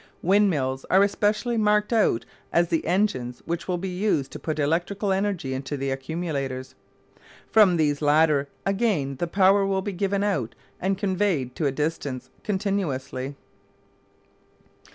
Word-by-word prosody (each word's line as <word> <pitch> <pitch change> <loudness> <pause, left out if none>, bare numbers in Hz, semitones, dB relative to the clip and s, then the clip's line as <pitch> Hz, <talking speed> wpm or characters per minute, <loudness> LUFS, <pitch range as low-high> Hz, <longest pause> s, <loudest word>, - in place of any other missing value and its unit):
Windmills 165 -9 +2
are 190 +2 +6
especially 210 +4 +1
marked 210 +1 +2
out 160 - +2 0.3
as 170 0 +2
the 165 - 0
engines 145 -10 0
which 170 0 -3
will 180 -1 0
be 190 +2 -4
used 180 -9 0
to - - -7
put 155 -1 -3
electrical 175 +7 0
energy 190 -9 -1
into 135 +2 -4
the 135 0 -2
accumulators. 135 -2 -4 0.8
From 205 -6 +6
these 150 -2 +1
latter 150 -1 +3 0.2
again 195 - 0
the 175 - -1
power 195 +2 +4
will 195 -1 0
be 205 - -3
given 200 +2 0
out 140 - -1 0.2
and 190 +1 0
conveyed 185 - 0
to 155 - 0
a - - +1
distance 135 -3 -3
continuously. 160 -10 -2
170 Hz, 140 wpm, -25 LUFS, 140-200 Hz, 0.8 s, are